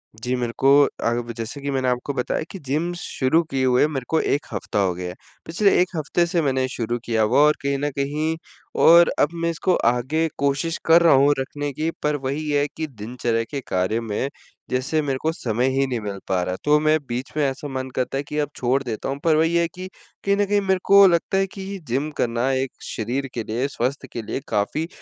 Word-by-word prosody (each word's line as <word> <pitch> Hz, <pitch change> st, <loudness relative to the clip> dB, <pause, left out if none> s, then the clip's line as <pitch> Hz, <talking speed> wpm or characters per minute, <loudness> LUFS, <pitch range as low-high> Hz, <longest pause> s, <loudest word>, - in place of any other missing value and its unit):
जी, 125 Hz, +3 st, -2 dB
मेरे 120 Hz, -2 st, -2 dB
को 135 Hz, -, +3 dB, 0.4 s
आग 120 Hz, +1 st, +1 dB
भी 120 Hz, -, -6 dB
जैसे 115 Hz, +5 st, -5 dB
कि 140 Hz, 0 st, -2 dB
मैंने 130 Hz, -1 st, 0 dB
आपको 125 Hz, +3 st, -1 dB
बताया 125 Hz, +4 st, -1 dB
कि 195 Hz, -, -7 dB
जिम 155 Hz, +6 st, -1 dB
शुरू 160 Hz, -1 st, +1 dB
किए 130 Hz, -1 st, +1 dB
हुए 125 Hz, +2 st, +4 dB
मेरे 135 Hz, -5 st, -4 dB
को 160 Hz, -, +2 dB
1 145 Hz, -, 0 dB
हफ्ता -, -, -2 dB
हो 95 Hz, -3 st, +2 dB
गया 90 Hz, 0 st, -5 dB
है, -, -, -8 dB, 0.3 s
पिछले 195 Hz, +5 st, +2 dB
1 185 Hz, -, +1 dB
हफ्ते 160 Hz, +2 st, +1 dB
से 170 Hz, 0 st, 0 dB
मैंने 130 Hz, -3 st, +1 dB
शुरू 120 Hz, -1 st, -2 dB
किया 115 Hz, -2 st, +1 dB
होगा 110 Hz, +5 st, +2 dB
और 150 Hz, +1 st, +5 dB
कहीं 140 Hz, 0 st, 0 dB
न 145 Hz, +1 st, 0 dB
कहीं 150 Hz, +3 st, -1 dB, 0.5 s
और 170 Hz, +1 st, +8 dB
अब 145 Hz, -, +4 dB
मैं 170 Hz, 0 st, -1 dB
इसको 175 Hz, +2 st, +1 dB
आगे 130 Hz, +7 st, +1 dB
कोशिश 140 Hz, +4 st, 0 dB
कर 165 Hz, +1 st, +6 dB
रहा 170 Hz, -, +6 dB
हूँ 140 Hz, +2 st, +5 dB
रखने 145 Hz, +2 st, -3 dB
की, 155 Hz, +4 st, -1 dB
पर 150 Hz, 0 st, +1 dB
वही 145 Hz, +3 st, -3 dB
है 145 Hz, 0 st, +2 dB
कि 160 Hz, -1 st, -2 dB
दिनचर्या 115 Hz, -1 st, -2 dB
के 140 Hz, -2 st, -3 dB
कार्य 95 Hz, +5 st, 0 dB
में 115 Hz, +4 st, -2 dB, 0.4 s
जैसे 130 Hz, +5 st, 0 dB
मेरे 135 Hz, -3 st, -1 dB
को 160 Hz, -, +1 dB
समय 120 Hz, -3 st, -1 dB
ही 135 Hz, -, +3 dB
नहीं 125 Hz, -3 st, -2 dB
मिल 100 Hz, -2 st, -5 dB
पा 95 Hz, -1 st, +1 dB
रहा 90 Hz, -, -2 dB
है। 90 Hz, -, -3 dB
तो 150 Hz, 0 st, +4 dB
मैं 155 Hz, +1 st, +3 dB
बीच 125 Hz, +3 st, -4 dB
में 150 Hz, -, +2 dB
ऐसा 135 Hz, +2 st, -6 dB
मन 130 Hz, -1 st, -4 dB
करता 130 Hz, +1 st, -1 dB
है 140 Hz, -, -2 dB
कि 150 Hz, +1 st, -6 dB
अब 145 Hz, -1 st, 0 dB
छोड़ 130 Hz, +2 st, +1 dB
देता 115 Hz, +1 st, -4 dB
हूँ, 140 Hz, -, -3 dB
पर 160 Hz, -2 st, +4 dB
वही 165 Hz, +2 st, +2 dB
है 170 Hz, 0 st, +3 dB
कि, 185 Hz, +3 st, -8 dB, 0.4 s
कहीं 200 Hz, 0 st, +3 dB
न 205 Hz, -, +2 dB
कहीं 205 Hz, 0 st, +1 dB
मेरे 190 Hz, -1 st, +1 dB
को 200 Hz, 0 st, +8 dB
लगता 175 Hz, +2 st, +1 dB
है 195 Hz, -, +2 dB
कि 195 Hz, 0 st, -6 dB
जिम 135 Hz, +6 st, -1 dB
करना 120 Hz, +2 st, 0 dB
एक 130 Hz, 0 st, -1 dB, 0.2 s
शरीर 125 Hz, +5 st, -2 dB
के 115 Hz, -, -3 dB
लिए, 120 Hz, +6 st, -2 dB
स्वास्थ्य 135 Hz, 0 st, -3 dB
के 115 Hz, -, -4 dB
लिए 110 Hz, +5 st, -4 dB
काफ़ी 150 Hz, +11 st, -1 dB
140 Hz, 235 wpm, -22 LUFS, 125-160 Hz, 0.5 s, और